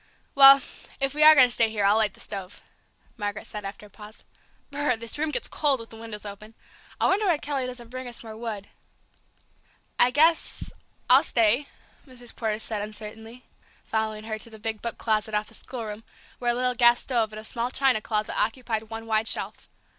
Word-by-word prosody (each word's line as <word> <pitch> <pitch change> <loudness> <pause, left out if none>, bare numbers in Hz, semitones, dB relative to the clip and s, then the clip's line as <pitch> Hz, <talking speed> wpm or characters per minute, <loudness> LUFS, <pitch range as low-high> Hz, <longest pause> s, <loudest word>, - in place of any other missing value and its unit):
"Well, 275 0 +10 0.4
if 275 0 0
we 300 - -2
are 310 0 +9
going 260 -3 +8
to - - +1
stay 225 -1 +4
here, 210 -2 -1
I'll 205 +2 +5
light 215 -3 +1
the - - -17
stove," 195 -1 -6 0.5
Margaret 205 -1 -4
said 210 -1 -7
after 200 +1 -8
a - - -16
pause. 210 +2 -14 0.5
"B 285 - -6
r - - -1
r - - +2
r! - - +2
this 230 +5 -6
room 315 +1 0
gets 470 - -2
cold 285 -4 +1
with 230 - -11
the - - -11
windows 225 -2 -7
open! 210 +2 -10 0.4
I - - +2
wonder 400 +3 +2
why 340 -4 +3
Kelly 285 -3 -3
doesn't 245 -2 -8
bring 255 0 -6
us 240 -1 -9
more 220 -1 -9
wood?" 220 -3 -6 1.3
"I 245 - +6
guess 315 +5 +2 0.3
I'll 255 +2 +7
stay!" 240 0 +2 0.4
Mrs. 245 -2 -12
Porter 220 -2 -2
said 220 -1 -3
uncertainly, 220 +3 -8 0.4
following 220 -1 -2
her 220 0 -5
to 230 - -2
the 220 - -12
big 220 0 -4
book 235 -1 -5
closet 215 -1 -1
off 210 +1 -1
the - - -15
schoolroom, 225 -3 -6 0.4
where 240 - -1
a 240 - +2
little 250 0 0
gas 240 0 +5
stove 230 -4 0
and 215 - -8
a - - -10
small 235 +2 -3
china 260 -4 +2
closet 215 -1 -2
occupied 225 -1 -2
one 225 0 -7
wide 220 0 0
shelf. - - -3
225 Hz, 210 wpm, -25 LUFS, 215-255 Hz, 1.3 s, Well